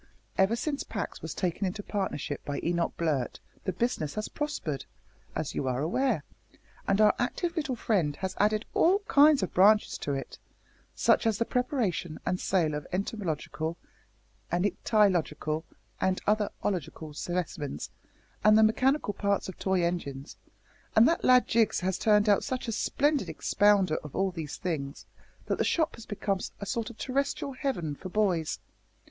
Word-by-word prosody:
Ever 190 +4 +3
since 280 +4 -2
Pax - - -5
was - - -5
taken 185 +1 -1
into 205 +3 -4
partnership 190 -9 -3
by 145 -1 -3
Mr - - -10
Enoch 170 0 0
Blurt 150 -7 -1 0.3
the 190 - +1
business 180 -7 -1
has 215 0 -3
prospered, 230 - -3 0.5
as - - -2
you 135 - -2
are 125 0 0
aware, 210 - +1 0.6
and 195 +1 +2
our 215 -1 +6
active 335 +8 -1
little 295 -6 -1
friend 180 -11 +1
has 190 -1 -3
added 215 +1 +2
all 390 +5 +4
kinds 290 -4 +6
of 185 - -3
branches 210 +3 +4
to 145 - -2
it 135 - -6 0.6
such - - +3
as 220 -3 +2
the 230 - +1
preparation 230 - -1
and 180 - 0
sale 170 -5 +1
of 150 0 -4
entomological, 170 -4 -3 0.7
and 175 +3 +1
ichthyological, 170 -7 +1 0.3
and 190 0 +1
other 210 0 +2
ological 160 -5 -3
specimens, 160 -3 -4 0.5
and 215 0 +7
the 220 - +6
mechanical 255 +2 +2
parts 200 0 0
of 190 - -8
toy 190 -2 +1
engines; 145 -5 -3 0.6
and 225 +2 +7
that 335 - +1
lad 250 0 +6
Jiggs 225 -4 +2
has 185 0 -1
turned 210 -1 +4
out 205 -1 +4
such 255 -2 -3
a - - -1
splendid 290 +6 +1
expounder 205 -5 +3
of 150 - -9
all 195 0 +1
these 155 -5 -6
things, 145 -6 -4 0.4
that - - -1
the - - +3
shop 320 -1 +1
has 230 - -11
become 200 -2 -1 0.2
a 200 - -5
sort 230 +3 -2
of 235 - -12
terrestrial 275 +1 -1
heaven 250 - -2
for 185 - -8
boys. 185 -6 +1
195 Hz, 165 wpm, -29 LUFS, 165-230 Hz, 0.7 s, and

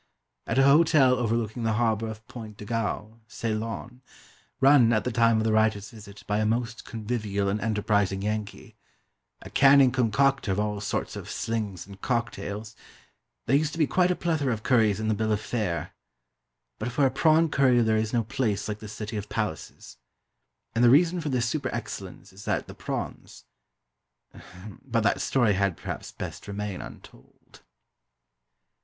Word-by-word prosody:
At - - -1
a 135 - +6
hotel 140 -2 +5
overlooking 115 0 -1
the 115 -1 +1
harbour 115 -1 +1
of 110 0 -9
Point 110 -4 -9
de 105 - -9
Galle, 115 0 -3
Ceylon, 115 +2 -4 0.6
"run," 135 -4 +6
at 110 -1 +1
the 125 - -2
time 115 -1 +3
of 110 - +1
the 110 - +1
writer's 110 -2 +1
visit, 105 -2 -13
by 105 0 0
a - - +1
most 115 +1 -2
convivial 105 -4 -2
and 105 +2 -1
enterprising 105 -3 0
Yankee, 105 0 -4 0.7
a - - -11
canning 135 -1 +6
concocter 130 0 +1
of 95 - 0
all 105 -1 -1
sorts 105 - -3
of - - -7
"slings" 105 -6 -3
and 100 0 -13
"cocktails," 110 -3 -3 0.7
there 135 - +3
used 150 +1 +1
to - - -6
be 160 - +3
quite 180 +5 +2
a 180 - +1
plethora 155 -7 0
of 110 -2 -3
curries 110 -5 +3
in 110 - -2
the 110 - +2
bill 110 +1 -1
of 105 - +1
fare. 105 -7 -3 0.9
But 120 +3 -3
for 140 +3 +2
a 130 - +2
prawn 160 +4 +3
curry 130 -4 +3
there 110 -1 +2
is 110 0 0
no 120 -1 +1
place 110 -4 -1
like 105 -1 -4
the 110 - -9
City 105 +1 -6
of 105 0 -6
Palaces. 105 -8 -5 0.8
And 115 - +2
the 120 - +7
reason 170 +6 +4
for 155 - -3
this 125 -3 0
super 135 0 -2
excellence 100 -6 -7
is 100 +2 -12
that - - -1
the - - -10
prawns - - -6 1.4
but 120 -4 0
that 100 - +1
story 120 -6 +2
had, 100 -2 0
perhaps, - - -6
best - - -8
remain 100 -2 -4
untold. - - -15
110 Hz, 175 wpm, -26 LUFS, 105-125 Hz, 1.4 s, the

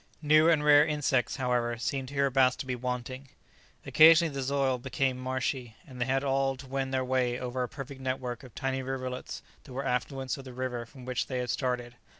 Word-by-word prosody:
New 155 +2 +5
and 155 -3 +3
rare 145 0 +7
insects, 145 -5 0
however, 125 -3 0
seemed 130 +2 -3
hereabouts 135 -2 +3
to - - -6
be 130 -1 -2
wanting. 125 +2 -5 0.6
Occasionally 160 0 +6
the 135 - -3
soil 135 -1 0
became 130 +1 -1
marshy, 130 -2 -3
and 130 -5 -10
they 130 +2 0
all 135 0 +1
had 130 - -14
to 135 - -13
wend 135 0 -2
their 130 -1 0
way 125 -1 +1
over 125 0 -3
a 125 - -2
perfect 135 -1 -8
network 130 -2 -3
of 125 -4 -14
tiny 135 0 -2
rivulets 130 -1 -5 0.2
that 130 - -12
were 135 +2 -3
affluents 130 +1 -2
of 135 - -10
the 130 - -9
river 125 -2 -4
from 130 0 -13
which 130 0 -2
they 130 - -3
had 125 -1 -1
started. 120 -2 -2
130 Hz, 200 wpm, -29 LUFS, 125-135 Hz, 0.6 s, rare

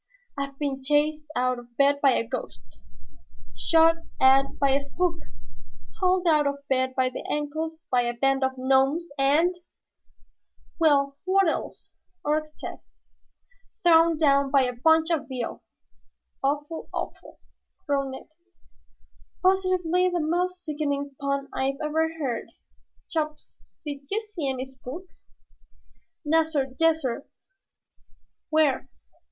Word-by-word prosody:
I've 275 -1 -5
been 275 -2 -3
chased 300 +2 +1
out 255 0 +1
of 240 0 -17
bed 285 0 +3
by 275 -2 +5
a 230 - 0
ghost, 125 - -7 0.8
shot 330 0 +4 0.2
at 270 +1 +4
by 275 -1 +2
a 280 +1 +2
spook, 335 +4 -1 0.8
hauled 365 0 +2
out 305 -3 +4
of 280 0 -4
bed 260 -1 0
by 255 -1 +2
the 255 - -7
ankles 315 +2 -3
by 250 -1 +4
a 240 0 -1
band 270 +2 +1
of 265 0 +1
gnomes, 270 +6 +2
and 315 +7 +3 0.6
" - - -38
"Well, 280 -3 +3
what 385 0 +3
else?" 320 - -4 0.3
urged 305 +1 -1
Tad. - - -6 1.0
"Thrown 330 -1 +5
down 280 -3 +3
by 275 -1 +4
a 250 -1 -1
bunch 320 +6 +3
of 305 -3 0
Veal." 250 -3 -4 0.8
"Awful, 295 +3 -2
awful!" - - -6 0.5
groaned 275 -2 -1
Ned. 265 - -9 1.2
"Positively 365 -1 +2
the 355 -1 -1
most 360 +3 -1
sickening 285 -2 -2
pun 275 0 -1
I 270 +1 -1
ever 320 +2 0
heard. 260 -7 -3 0.6
Chops, 305 -2 -4 0.3
did 290 -2 -4
you 420 - 0
see 410 -10 -4
any 260 0 -3
spooks?" 265 +7 -11 1.0
"Nassir, 300 -4 +1
yassir." 315 -6 +1 1.2
"Where?" 300 -4 +2
290 Hz, 125 wpm, -26 LUFS, 270-325 Hz, 1.2 s, by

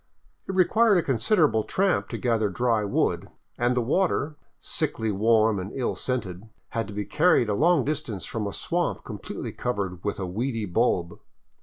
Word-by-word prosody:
It 190 - -2
required 205 +3 +4
a 170 - +2
considerable 135 - +2
tramp 195 - 0
to - - -4
gather 115 -4 +1
dry 115 +2 +1
wood, 100 - 0 0.3
and 120 +1 +1
the - - +3
water, 150 +2 0 0.2
sickly 110 -1 -1
warm 110 +1 +3
and 95 +2 -5
ill 130 -3 -1
scented, 110 -5 -4 0.2
had 115 -1 -2
to 105 - -8
be 105 0 -2
carried 150 -8 +3
a - - +1
long 160 +4 +3
distance 135 - -3
from 110 -3 -3
a - - -3
swamp - - -2
completely - - -6
covered 95 -7 -3
with 105 -1 -2
a 95 - -2
weedy 115 +4 -2
bulb. 90 -3 0
115 Hz, 170 wpm, -26 LUFS, 105-145 Hz, 0.3 s, required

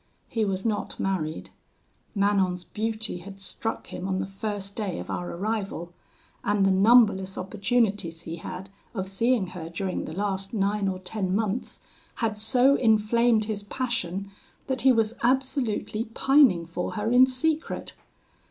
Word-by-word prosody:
He 225 -2 0
was 190 0 -2
not 210 -2 -2
married. 165 -5 -2 0.6
Manon's 195 -3 +2
beauty 220 -1 -3
had 195 +2 -11
struck 225 +3 -3
him 180 - -4
on 190 -1 0
the 190 - -1
first 200 0 -4
day 200 -6 -2
of - - -6
our 175 - -3
arrival; 195 -3 -3 0.5
and 205 -1 +2
the 195 - +4
numberless 195 -2 +5
opportunities 200 -3 0
he 165 0 -6
had 185 +3 -7 0.2
of 190 -2 -2
seeing 225 +2 +2
her 165 -3 -6
during 185 +2 -3
the 155 - -6
last 195 +2 -2
nine 200 0 +1
or 190 -1 -1
ten 185 0 -2
months, 220 +2 -2 0.3
had 220 -2 -1
so 250 +5 +4
inflamed 225 -1 +3
his 210 -1 -3
passion, 200 -4 -3 0.3
that 265 -1 -1
he 265 - +6
was 225 -1 +1
absolutely 240 -4 0
pining 230 - +4
for 170 +2 -4
her 215 +1 -1
in 255 +1 +7
secret. 310 +5 -1
205 Hz, 150 wpm, -26 LUFS, 190-225 Hz, 0.6 s, in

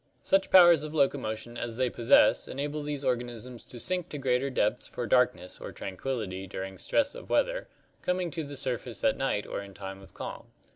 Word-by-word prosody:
Such 195 0 +3
powers 175 -4 +8
of 155 +1 -6
loco 140 -1 +3
motion 110 +1 -5
as 115 -1 -4
they 130 0 +2
possess 120 +3 +4
enable 145 +2 -3
these 145 -1 -4
organisms 120 -1 -3
to 120 - -9
sink 180 +5 -2
to 150 - -5
greater 130 0 +1
depths 105 -5 0
for 120 - -4
darkness 125 -5 +1
or - - -6
tranquillity 95 -2 -4
during 95 0 -6
stress 285 -1 +1
of - - -10
weather, - - +1 0.3
coming 180 -1 0
to 165 0 -3
the 145 -1 -6
surface 125 -3 -3
at - - +4
night - - -1
or - - -4
in 100 -1 -11
time 95 0 -7
of 95 - -16
calm. - - -7
125 Hz, 195 wpm, -29 LUFS, 110-150 Hz, 0.3 s, powers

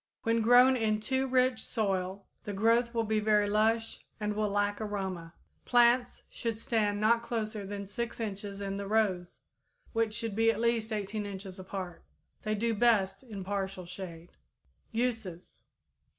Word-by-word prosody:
When 230 0 +2
grown 245 +3 +7
in 215 -3 +1
too 265 +4 0
rich 255 -2 +3
soil, 195 -3 -2 0.2
the 205 - -4
growth 230 +4 +3
will 230 -1 0
be 220 0 +1
very 210 -1 +3
lush 225 +2 +1 0.2
and 210 0 -1
will 210 0 0
lack 205 +1 0
aroma. 190 -5 -4 0.3
Plants 245 0 +3
should 230 -2 -3
stand 215 -3 0
not 230 +2 +4
closer 215 -3 -3
than 200 0 -5
6 235 +5 -4
inches 205 -2 -5
in 195 0 -3
the 200 0 -4
rows, 195 -5 0 0.5
which 225 -2 +1
should 225 -2 -3
be 225 +1 +4
at 225 -1 +1
least 230 -1 +1
18 210 0 -3
inches 190 -1 -7
apart. 185 -2 -6 0.4
They 215 0 -1
do 230 +2 0
best 205 -4 +2
in 215 -7 -7
partial 195 -1 -3
shade. 175 -2 -8 0.6
_Uses. 225 -7 -3
215 Hz, 155 wpm, -31 LUFS, 195-230 Hz, 0.6 s, grown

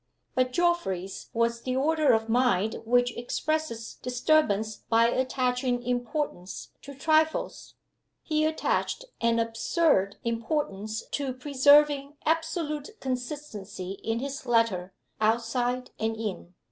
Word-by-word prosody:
But 255 0 +1
Geoffrey's 250 - -1
was 235 0 0
the 255 +1 -2
order 300 +1 +3
of 225 -1 +2
mind 225 -3 +2
which 245 +1 +2
expresses 245 -1 -3
disturbance 245 -5 +2
by 230 0 +3
attaching 250 -1 0
importance 245 - -3
to 280 0 -10
trifles. 315 +3 +1 0.5
He 310 -1 +1
attached 315 +9 0 0.2
an 230 0 +3
absurd 230 - +2
importance 225 -3 -2
to 275 -3 -2
preserving 285 +1 +4
absolute 320 +3 -1
consistency 245 -8 -5
in 225 0 0
his 275 +2 -5
letter, 225 -6 +2 0.3
outside 240 +3 0
and 220 0 -1
in. 195 -5 -5
245 Hz, 110 wpm, -27 LUFS, 225-295 Hz, 0.5 s, preserving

